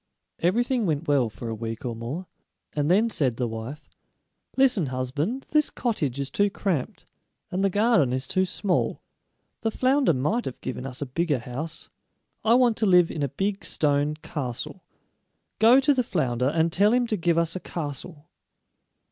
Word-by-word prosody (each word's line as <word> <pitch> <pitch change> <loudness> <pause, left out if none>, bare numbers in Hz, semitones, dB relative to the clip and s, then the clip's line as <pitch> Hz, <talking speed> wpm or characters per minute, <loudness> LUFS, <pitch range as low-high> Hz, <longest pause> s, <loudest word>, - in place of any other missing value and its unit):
Everything 235 +5 +1
went 155 0 -1
well 135 -5 +3
for 115 +2 -8
a 115 - -3
week 115 +2 -5
or 120 -2 -3
more, 125 +11 -5 0.5
and 145 0 0
then 205 +6 +4
said 135 - +1
the 125 - 0
wife: 115 +7 -7 0.7
"Listen, 250 - +4
husband; 145 - -2
this 300 -1 +4
cottage 150 - -2
is 140 -1 -3
too 205 +6 +2
cramped, 185 -8 -3 0.5
and 185 +2 -1
the 195 - +3
garden 205 - +3
is 130 +1 -1
too 185 +7 +1
small. 190 0 -1 0.6
The 225 - 0
flounder 260 - +2
might 180 - 0
have 130 - -6
given 130 0 -5
us 130 +2 -4
a - - -4
bigger 150 +2 0
house. 130 +7 -6 0.5
I 225 +2 +5
want 245 -3 +4
to 215 - +2
live 180 -2 +5
in 155 - -4
a 140 - 0
big 195 +7 -2
stone 145 0 +1
castle. 150 +3 -5 0.8
Go 235 +4 +7
to 290 +2 +3
the 260 - +2
flounder, 130 - 0
and 160 +3 +1
tell 205 +4 +4
him 245 0 +3
to 225 - -1
give 170 -3 +1
us 170 0 +1
a - - -2
castle." 150 -1 -6
165 Hz, 175 wpm, -25 LUFS, 135-210 Hz, 0.8 s, Go